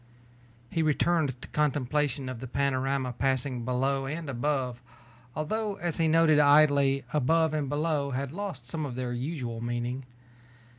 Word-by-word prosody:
He 165 Hz, -, 0 dB
returned 155 Hz, -3 st, +1 dB
to -, -, -7 dB
contemplation 145 Hz, -2 st, 0 dB
of 130 Hz, -2 st, -5 dB
the 130 Hz, -, -6 dB
panorama 135 Hz, 0 st, 0 dB
passing 130 Hz, 0 st, -1 dB
below 135 Hz, +2 st, 0 dB
and 155 Hz, 0 st, -4 dB
above, 125 Hz, -1 st, -1 dB, 0.5 s
although 205 Hz, +7 st, -2 dB
as 175 Hz, -3 st, -3 dB
he 165 Hz, -, +2 dB
noted 160 Hz, -1 st, +5 dB
idly, 145 Hz, -2 st, +5 dB
above 160 Hz, +2 st, +2 dB
and 150 Hz, -3 st, -1 dB
below 145 Hz, -1 st, 0 dB
had 135 Hz, 0 st, -3 dB
lost 175 Hz, -9 st, -6 dB
some 155 Hz, +4 st, -3 dB
of 135 Hz, -4 st, -4 dB
their 125 Hz, -1 st, -3 dB
usual 120 Hz, -3 st, -4 dB
meaning. 120 Hz, +2 st, -3 dB
140 Hz, 145 wpm, -28 LUFS, 130-155 Hz, 0.5 s, noted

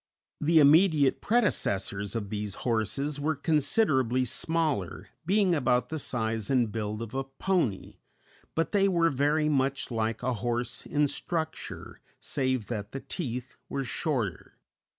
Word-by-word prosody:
The 160 Hz, +2 st, +3 dB
immediate 150 Hz, -1 st, +5 dB
predecessors 100 Hz, -, 0 dB
of 105 Hz, -3 st, -3 dB
these 105 Hz, -2 st, -3 dB
horses 130 Hz, +6 st, 0 dB
were 155 Hz, +2 st, 0 dB
considerably 140 Hz, -, +2 dB
smaller, 155 Hz, -, -1 dB, 0.2 s
being 195 Hz, -1 st, +3 dB
about 125 Hz, -5 st, +1 dB
the 160 Hz, -, -3 dB
size 110 Hz, -5 st, -2 dB
and 125 Hz, -5 st, +2 dB
build 110 Hz, 0 st, -3 dB
of 115 Hz, +1 st, -8 dB
a 135 Hz, 0 st, -1 dB
pony, 135 Hz, -, -1 dB, 0.6 s
but 165 Hz, -, 0 dB
they 195 Hz, -1 st, +3 dB
were 170 Hz, -3 st, +3 dB
very 145 Hz, +3 st, +2 dB
much 135 Hz, -2 st, 0 dB
like 110 Hz, -1 st, -1 dB
a 130 Hz, -, +1 dB
horse 120 Hz, +2 st, -2 dB
in 150 Hz, 0 st, +2 dB
structure, 160 Hz, +2 st, -4 dB, 0.2 s
save 130 Hz, -4 st, -1 dB
that 105 Hz, -2 st, -5 dB
the 135 Hz, -, -4 dB
teeth 125 Hz, -6 st, -5 dB
were 135 Hz, -, -2 dB
shorter. 125 Hz, -, -3 dB
135 Hz, 135 wpm, -28 LUFS, 115-155 Hz, 0.6 s, immediate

